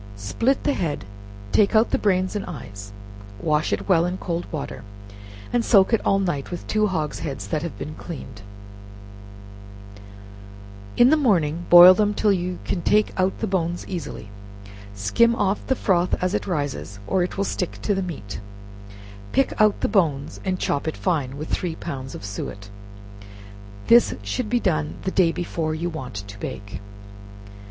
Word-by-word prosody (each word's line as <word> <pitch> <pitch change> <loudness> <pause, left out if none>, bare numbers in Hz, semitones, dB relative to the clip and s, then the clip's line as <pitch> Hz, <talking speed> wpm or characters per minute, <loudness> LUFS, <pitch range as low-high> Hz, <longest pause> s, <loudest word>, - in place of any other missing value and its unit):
Split 230 - 0
the 290 - +2
head, 155 - -2 0.5
take 210 +1 +3
out 220 +2 +4
the - - +1
brains 185 -1 +1
and 205 - -2
eyes, 100 - -8 0.5
wash 150 +5 0
it - - -2
well 175 -4 +4
in 180 +1 -2
cold 170 -2 -3
water, 140 -6 -5 0.7
and 240 -1 +2
soak 200 -1 +4
it 225 - +3
all 195 - +3
night 175 -8 -2
with 175 - -6
two 215 0 +1
hog's 155 -6 -2
heads 140 -3 -5
that 155 -3 -1
have 170 0 -5
been 155 - -6
cleaned; 130 -11 -9 2.6
in 245 +3 +6
the - - +6
morning, 175 - +1
boil 175 +1 +11
them 210 +2 +1
till 210 - +3
you 180 -1 -2
can 175 - -2
take 210 +4 +2
out 185 +1 0
the - - +1
bones 175 -2 -1
easily; 170 - -6 0.7
skim 230 - +3
off 205 -2 -1
the 265 - +2
froth 180 -6 +1
as 185 +1 -1
it - - -2
rises, 140 - -3
or 190 - +1
it 180 - -2
will 200 - +1
stick 180 -2 -2
to 205 - +1
the 195 - -1
meat; 105 - -6 0.9
pick 270 0 +2
out 215 -1 +3
the - - +2
bones, 155 -9 0
and 185 -1 -1
chop 145 +2 -1
it 160 - -3
fine, 140 -7 -1
with 155 +2 -5
three 175 -3 -2
pounds 135 -6 -6
of - - -8
suet. 100 0 -6 1.1
This 235 0 +5
should 210 - -3
be 245 +1 +2
done 75 - 0
the 190 - -1
day 180 -4 +3
before 165 -2 -3
you 170 +2 -3
want 130 -8 -7
to 100 0 -11
bake. 100 -2 -6
175 Hz, 170 wpm, -23 LUFS, 140-195 Hz, 2.6 s, boil